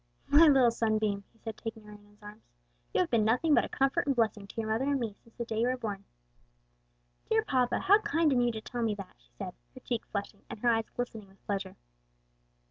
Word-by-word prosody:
"My 300 +3 +8
little 265 -5 +6
sunbeam," 215 -3 0
he - - -29
said 225 -1 -7
taking 225 -1 -7
her 210 - -13
in 205 0 -14
his 210 0 -24
arms; 210 +1 -11 0.5
"you - - +2
have 355 - -1
been 230 -3 +3
nothing 250 +9 +3
but - - +5
a - - -5
comfort 270 +1 +1
and 275 - +2
blessing 215 -4 0
to - - -13
your 220 - -2
mother 225 +5 +1
and 280 -1 +1
me, 225 -4 -3
since 230 - -23
the 235 - -4
day 225 -1 -2
you 240 - +3
were 255 +1 0
born." 205 -5 -5 1.2
"Dear 445 0 +3
papa, 255 - +1
how 405 +3 +6
kind 330 -8 +2
in 245 - +3
you 240 0 +2
to 220 -1 -6
tell 240 +2 -5
me 220 -2 +1
that!" 195 -2 -9
she - - -28
said, - - -5 0.2
her - - -9
cheek 235 -2 -3
flushing 200 0 -5
and - - -6
her 245 - +3
eyes 225 -1 +1
glistening 225 -4 -4
with 195 0 -24
pleasure. 195 -2 -3
225 Hz, 240 wpm, -30 LUFS, 210-255 Hz, 1.2 s, My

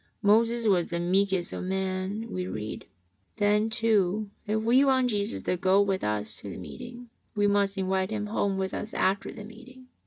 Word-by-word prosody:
Moses 230 +3 +3
was 185 -5 +2
the 170 - -2
meekest 190 +1 +1
of - - -4
men, 190 +2 -2
w'e 185 -4 -4
read. 110 0 -5 0.5
Then, 210 +1 +2
too, 215 -3 +1 0.2
if 215 +1 +1
we 235 +5 +4
want 260 -2 +3
Jesus 205 +1 -2
to 180 - 0
go 190 +2 +3
with 195 -2 +1
us 105 0 -2
to 100 - -8
the - - -7
meeting, 240 - -9 0.2
we 205 -1 +2
must 200 -1 +2
invite 190 0 0
Him 210 -1 -2
home 200 -2 -1
with 190 -1 -2
us 215 - -5
after 195 +1 +1
the 210 - -9
meeting. 255 +3 -14
200 Hz, 185 wpm, -27 LUFS, 185-220 Hz, 0.5 s, we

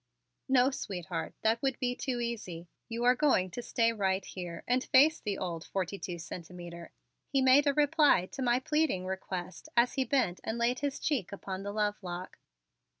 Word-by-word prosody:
"No, 260 0 +5
sweetheart, 175 - -4
that 225 +1 +2
would 270 -3 0
be 250 -1 -1
too 250 -1 -2
easy. 210 -8 -4 0.2
You 230 +1 -3
are 250 +1 +6
going 250 -10 +2
to 245 - -5
stay 230 -1 +1
right 190 -2 0
here 175 -3 -7
and 250 +1 +2
face 305 +5 +5
the 205 -2 -3
old 170 -3 -4
Forty 195 +1 -3
Two 175 -2 -5
Centimeter," 170 0 -8 0.4
he 275 - +1
made 265 +2 +6
a 285 - +4
reply 295 - +4
to - - -6
my 245 -1 +3
pleading 300 -9 0
request 185 -1 -5
as 240 +1 +4
he 265 - +1
bent 235 -8 +1
and 220 - -3
laid 240 +2 +1
his 285 -1 -2
cheek 240 - -1
upon 195 -1 -5
the 200 +1 -4
lovelock. 205 -4 -3
220 Hz, 180 wpm, -31 LUFS, 185-260 Hz, 0.4 s, are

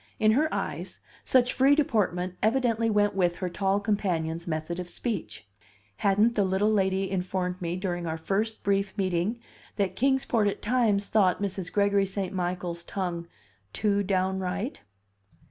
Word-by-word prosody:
In 215 0 +4
her 300 +7 +2
eyes, - - -4 0.2
such 245 -1 +3
free 275 +2 +5
deportment 185 - 0
evidently 230 -1 +2
went 205 -1 +2
with 175 -3 +1
her 180 +1 -3
tall 195 +2 +1
companion's 175 -6 -1
method 155 +2 -3
of 180 -1 -5
speech: 110 - -4 0.5
hadn't 205 - +3
the 210 - +2
little 190 +3 +2
lady 190 -1 +1
informed 180 -1 -2
me 170 0 -2
during 175 -2 -3
our 160 0 -2
first 210 +7 -2
brief 195 -1 0
meeting 185 +3 0 0.4
that 200 -3 -1
Kings 265 +1 +2
Port 220 -3 +2
at 200 - -3
times 215 -4 +2
thought 195 -4 +3
Mrs. 190 -3 -3
Gregory 200 -1 +2
St. 190 0 -3
Michael's 175 -1 -3
tongue 175 -3 -4 0.5
"too 205 -1 +1
downright"? 190 +5 -1
195 Hz, 150 wpm, -27 LUFS, 180-215 Hz, 0.5 s, free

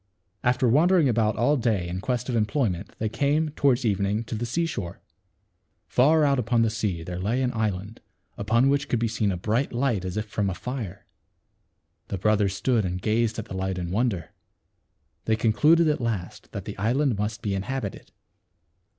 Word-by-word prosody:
After 125 0 +2
wandering 160 +5 +4
about 110 -3 +2
all 130 +6 +3
day 110 -8 0
in 90 +2 -4
quest 125 +1 -2
of 125 - -1
employment 105 - -1
they 110 - -1
came, 145 +7 +1
toward 135 -4 +1
evening, 100 +1 0
to 115 - -7
the 115 +2 -2
seashore. 125 - -3 0.9
Far 150 +5 +4
out 140 -2 +3
upon 115 0 +2
the 110 - +1
sea 105 -7 -2
there 90 +1 -5
lay 115 +8 0
an 125 - 0
island, 105 -1 -3 0.3
upon 115 +5 +2
which 140 0 +1
could 120 - +1
be 115 0 0
seen 105 -2 0
a 90 - -2
bright 110 +9 0
light 120 -6 0
as 95 +1 -4
if 105 - -1
from 105 -1 -1
a 95 - -3
fire. 115 -7 -6 1.0
The 100 - -3
brothers 105 0 +2
stood 120 0 +1
and 90 -1 -2
gazed 110 +3 0
at 110 - -4
the - - -9
light 95 0 -2
in 85 -1 -4
wonder. 100 -6 -1 0.9
They 110 - +2
concluded 150 +10 +4
at 150 -3 +1
last 110 -7 -4
that - - -6
the - - -7
island 120 +2 +1
must 105 +1 -3
be 100 - -1
inhabited. 100 +2 -4
110 Hz, 185 wpm, -25 LUFS, 100-125 Hz, 1.0 s, wandering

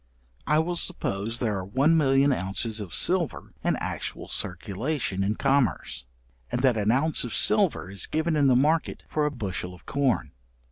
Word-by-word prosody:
I 150 - +3
will 170 +3 0
suppose 115 - -2
there 110 -5 -1
are - - -5
one 135 - +2
million 140 -2 +3
ounces 110 +2 -2
of 100 -5 -7
silver 175 - +2
in - - +1
actual - - -5
circulation 100 - -3
in 105 +2 0
commerce, 125 - 0 0.5
and 125 - -2
that 130 -3 +4
an 105 0 +1
ounce 145 +5 +2
of 120 - -4
silver 205 - +4
is 100 - -1
given 160 +1 -1
in 145 -2 +3
the 130 - +4
market 150 +5 +1
for 150 -1 0
a - - +1
bushel 95 -7 -5
of - - -20
corn. 140 -3 0
130 Hz, 175 wpm, -26 LUFS, 100-150 Hz, 0.5 s, that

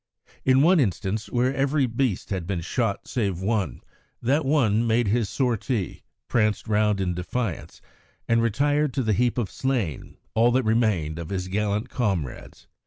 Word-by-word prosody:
In 130 +1 +4
one 175 +2 +5
instance, 105 - -1
where 125 +2 +1
every 135 +1 +1
beast 120 -5 -1
had 90 -4 -2
been 95 -3 -2
shot 100 +4 -2
save 100 -8 -1
one, 100 0 -1 0.4
that 140 +5 +1
one 120 -6 +2
made 115 0 +2
his 110 0 +1
sortie, 120 -5 -1 0.3
pranced 110 -2 +1
round 105 -1 +2
in 90 -2 0
defiance, 90 +2 -4 0.5
and 115 0 +3
retired 145 +5 +1
to 135 - +1
the 110 -2 +1
heap 120 +4 +1
of 115 -6 -1
slain, 120 - -2 0.2
all 115 +2 +4
that 130 +1 +3
remained 110 -9 +1
of 85 - -6
his 95 -2 -3
gallant 105 +2 -1
comrades. 95 - -3
110 Hz, 160 wpm, -25 LUFS, 100-125 Hz, 0.5 s, one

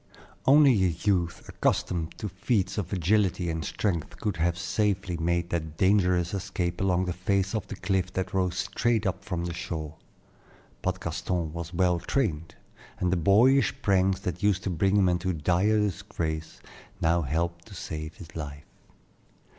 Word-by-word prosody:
Only 140 0 +7
a - - +5
youth 85 0 -1
accustomed 85 -3 -1
to 105 - -4
feats 95 0 0
of 90 -4 -4
agility 95 -1 +1
and 80 -1 -3
strength 85 -5 -2
could 105 -6 -2
have 85 +1 +1
safely 95 -1 0
made 85 +1 -1
that 80 -2 -3
dangerous 90 -2 +3
escape 95 -3 -2
along 95 -1 +2
the 90 - -2
face 95 +2 0
of 105 -3 -2
the - - -6
cliff 95 -2 -1
that 95 0 -3
rose 90 -1 0
straight 115 +2 0
up 95 0 -2
from 90 -4 -3
the 85 - -3
shore. 80 -3 -5 0.9
But 95 0 -1
Gaston 85 -1 -2
was 85 0 -5
well 90 -1 +2
trained, 85 - -1 0.4
and 90 -1 0
the - - +3
boyish 105 +7 +4
pranks 95 -1 +2
that 90 -1 -4
used 100 -2 +2
to 95 - -1
bring 95 +4 +2
him 95 -2 +4
into 90 +1 0
dire 90 +7 +2
disgrace 90 -6 -3 0.4
now 85 +1 +2
helped 85 +3 -2
to 100 - -11
save 80 -3 -6
his 85 -3 -12
life. 75 -2 -6
90 Hz, 160 wpm, -27 LUFS, 85-100 Hz, 0.9 s, Only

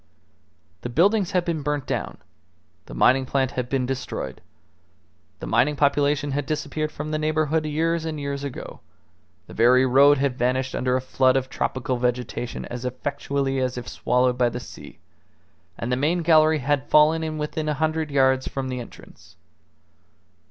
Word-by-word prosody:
The 120 - -5
buildings 190 - +2
had 180 -2 +1
been 165 -3 -2
burnt 145 -1 -2
down, - - -3 0.7
the - - -9
mining 130 - +3
plant 130 -1 0
had 125 -1 -4
been 130 -1 0
destroyed, 130 0 -5 1.0
the - - -6
mining 150 +2 +2
population 145 0 +1
had 140 0 -2
disappeared 155 0 -3
from 155 +1 -6
the 155 - -1
neighbourhood 155 0 0
years 165 +2 0
and 160 -2 -4
years 140 0 -4
ago; 140 -3 -7 0.7
the - - -13
very 125 +3 +4
road 140 +3 +5
had 135 -2 -1
vanished 130 +2 0
under 125 0 0
a 130 - 0
flood 130 0 +2
of 130 0 -3
tropical 130 0 -2
vegetation 125 0 -3
as 120 0 -7
effectually 135 +1 -2
as 130 -1 -1
if 125 - -6
swallowed 125 0 0
by 120 -1 +3
the 120 - -5
sea; - - -12 0.8
and 115 - -4
the - - +2
main 160 +6 0
gallery 155 -1 +5
had 145 0 -1
fallen 155 +2 +4
in 155 -1 -3
within 155 +1 -3
a 150 - 0
hundred 155 +1 -1
yards 130 -2 +2
from 135 -1 -4
the 125 -1 -3
entrance. 120 - -13
140 Hz, 165 wpm, -24 LUFS, 130-155 Hz, 1.0 s, road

